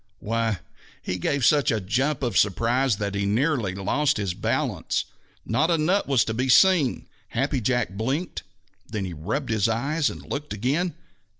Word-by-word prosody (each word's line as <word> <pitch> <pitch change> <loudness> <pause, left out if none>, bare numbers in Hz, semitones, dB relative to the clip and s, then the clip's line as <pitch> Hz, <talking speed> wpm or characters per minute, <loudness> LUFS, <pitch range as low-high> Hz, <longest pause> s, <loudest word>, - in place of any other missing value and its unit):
Why, 115 -2 -1 0.4
he 90 - -3
gave 140 +7 0
such 145 -2 +4
a 110 - +1
jump 130 +9 -1
of 120 -6 -1
surprise 115 +6 +2
that 100 -1 -3
he 100 0 -1
nearly 115 - +1
lost 140 +9 +1
his 100 -4 -1
balance. - - -1 0.4
Not 145 +9 +1
a 170 - +3
nut 180 +6 +1
was 135 -4 +3
to 110 - -2
be 130 +3 -1
seen! 170 -3 +4 0.2
Happy 135 +4 -1
Jack 120 0 +1
blinked. 130 - -2 0.5
Then, 105 -3 -3
he 90 - -5
rubbed 110 - -3
his 110 0 +2
eyes 140 +7 0
and - - -9
looked 145 -2 -4
again. 140 - -1
120 Hz, 170 wpm, -25 LUFS, 105-145 Hz, 0.5 s, such